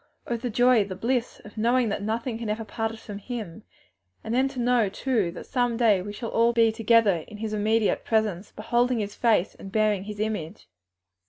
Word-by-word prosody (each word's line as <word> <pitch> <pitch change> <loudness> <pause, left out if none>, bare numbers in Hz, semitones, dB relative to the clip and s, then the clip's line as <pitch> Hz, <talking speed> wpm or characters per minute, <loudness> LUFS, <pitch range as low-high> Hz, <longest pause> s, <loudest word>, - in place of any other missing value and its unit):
Oh 240 - -2
the 240 +2 -3
joy, 245 -1 +4
the 195 -2 -6
bliss 240 +4 -1
of 210 +1 -10
knowing 240 +1 +2
that 200 - -2
nothing 225 +2 -2
can 230 -2 -4
ever 220 +1 -2
part 225 +1 -3
us 225 - -11
from 205 -2 -7
Him! 215 -4 -6 0.6
And 220 - -4
then 260 +2 +3
to 270 -2 -7
know, 240 -3 +2
too, 220 -3 0
that - - -9
some 245 -2 0
day 220 -6 +4
we 205 +3 -6
shall 225 +2 -6
all 230 +1 +3
be 230 -1 +4
together 225 -3 +3
in 210 - -10
His 215 0 -4
immediate 215 +1 +1
presence, 215 -4 0
beholding 240 +3 0
His 205 -2 -3
face 220 -6 +2
and 195 - -11
bearing 210 -2 +1
His 210 0 -7
image!" 210 -4 -4
220 Hz, 205 wpm, -26 LUFS, 210-235 Hz, 0.6 s, joy